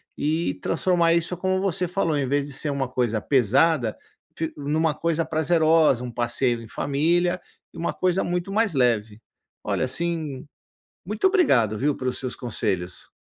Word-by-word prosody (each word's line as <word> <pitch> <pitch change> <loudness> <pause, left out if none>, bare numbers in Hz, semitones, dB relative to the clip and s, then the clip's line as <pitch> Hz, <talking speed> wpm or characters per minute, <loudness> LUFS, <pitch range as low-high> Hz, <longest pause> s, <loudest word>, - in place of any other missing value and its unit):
e 160 +3 0
transformar 170 -3 +2
isso, 170 +1 -1
como 190 +1 0
você 190 -2 0
falou, 170 -3 0
em 140 -2 0
vez 140 +1 +1
de 145 - -8
ser 145 +3 -2
uma 140 -2 -1
coisa 120 -4 0
pesada 130 +1 +2 0.4
fic 160 0 -3
numa 150 +2 0
coisa 165 +1 -1
prazerosa, 160 -4 +3
um 125 - -5
passeio 120 0 0
em 115 - -10
família 175 +8 0 0.3
e - - -13
uma 170 - -1
coisa 185 0 +1
muito 175 +2 -2
mais 210 -4 +1
leve. 110 -4 +1 0.4
Olha - - 0
assim, 160 -1 -3 0.6
muito 210 - 0
obrigado, 130 - +3
viu, 140 +5 +1
pelos 130 -1 -3
seus 130 -1 -4
conselhos. 95 -7 -3
150 Hz, 160 wpm, -24 LUFS, 125-170 Hz, 0.6 s, prazerosa